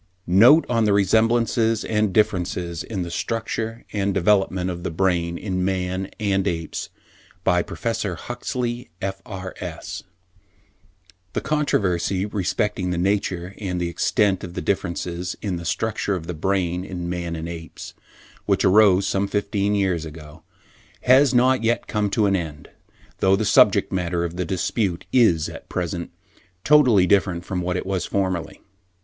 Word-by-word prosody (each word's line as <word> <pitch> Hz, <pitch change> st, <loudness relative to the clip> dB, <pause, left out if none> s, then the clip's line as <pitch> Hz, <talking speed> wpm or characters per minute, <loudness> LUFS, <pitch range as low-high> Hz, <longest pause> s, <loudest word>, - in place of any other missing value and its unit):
NOTE 120 Hz, -, +6 dB
ON 115 Hz, -2 st, +2 dB
THE 105 Hz, -, +3 dB
RESEMBLANCES 115 Hz, +2 st, +2 dB
AND 105 Hz, -2 st, +1 dB
DIFFERENCES 90 Hz, -4 st, 0 dB
IN 100 Hz, -5 st, -4 dB
THE 85 Hz, -, -6 dB
STRUCTURE 115 Hz, +3 st, -3 dB
AND 100 Hz, -2 st, 0 dB
THE -, -, +2 dB
DEVELOPMENT 95 Hz, -1 st, +2 dB
OF 85 Hz, -1 st, -6 dB
THE 90 Hz, -, -3 dB
BRAIN 85 Hz, 0 st, 0 dB
IN 90 Hz, -2 st, -2 dB
MAN 95 Hz, 0 st, -2 dB
AND 100 Hz, -2 st, +1 dB
APES 80 Hz, -2 st, -3 dB, 0.5 s
BY 90 Hz, -2 st, +3 dB
PROFESSOR 110 Hz, -2 st, -3 dB
HUXLEY, 120 Hz, +3 st, -4 dB
F.R.S. 95 Hz, -1 st, -6 dB, 1.3 s
The -, -, -1 dB
controversy 100 Hz, -, 0 dB
respecting 100 Hz, -1 st, -1 dB
the 90 Hz, -, -1 dB
nature 90 Hz, -1 st, -1 dB
and 90 Hz, -4 st, -3 dB
the 85 Hz, -1 st, -1 dB
extent 95 Hz, +2 st, +1 dB
of 90 Hz, 0 st, -7 dB
the -, -, -3 dB
differences 90 Hz, 0 st, -2 dB
in 95 Hz, -4 st, -3 dB
the 85 Hz, -, -7 dB
structure 105 Hz, +2 st, -1 dB
of 85 Hz, -3 st, -5 dB
the 90 Hz, -, -4 dB
brain 90 Hz, +1 st, -1 dB
in 90 Hz, -2 st, -5 dB
man 85 Hz, -1 st, -3 dB
and 80 Hz, 0 st, -5 dB
the -, -, -5 dB
apes, 80 Hz, -2 st, -9 dB, 0.5 s
which -, -, +2 dB
arose 100 Hz, -1 st, +5 dB
some 100 Hz, +1 st, 0 dB
fifteen 100 Hz, 0 st, 0 dB
years 95 Hz, -5 st, 0 dB
ago, 75 Hz, -1 st, -11 dB, 0.6 s
has 130 Hz, +2 st, +5 dB
not 130 Hz, 0 st, +4 dB
yet 115 Hz, +1 st, +1 dB
come 105 Hz, -1 st, -1 dB
to 105 Hz, +2 st, +1 dB
an 100 Hz, -1 st, +2 dB
end, 75 Hz, -5 st, -5 dB, 0.5 s
though 95 Hz, 0 st, +4 dB
the 110 Hz, +2 st, -1 dB
subject -, -, +4 dB
matter 90 Hz, -2 st, -1 dB
of 85 Hz, 0 st, -4 dB
the 90 Hz, 0 st, -2 dB
dispute 95 Hz, -1 st, -1 dB
is, 110 Hz, -11 st, +4 dB
at -, -, -10 dB
present, 85 Hz, 0 st, -3 dB, 0.5 s
totally 130 Hz, -11 st, +5 dB
different 90 Hz, -3 st, +1 dB
from 90 Hz, -2 st, -3 dB
what 90 Hz, +1 st, -1 dB
it -, -, -4 dB
was 95 Hz, -1 st, -1 dB
formerly. 95 Hz, -4 st, -2 dB
95 Hz, 155 wpm, -23 LUFS, 90-105 Hz, 1.3 s, NOTE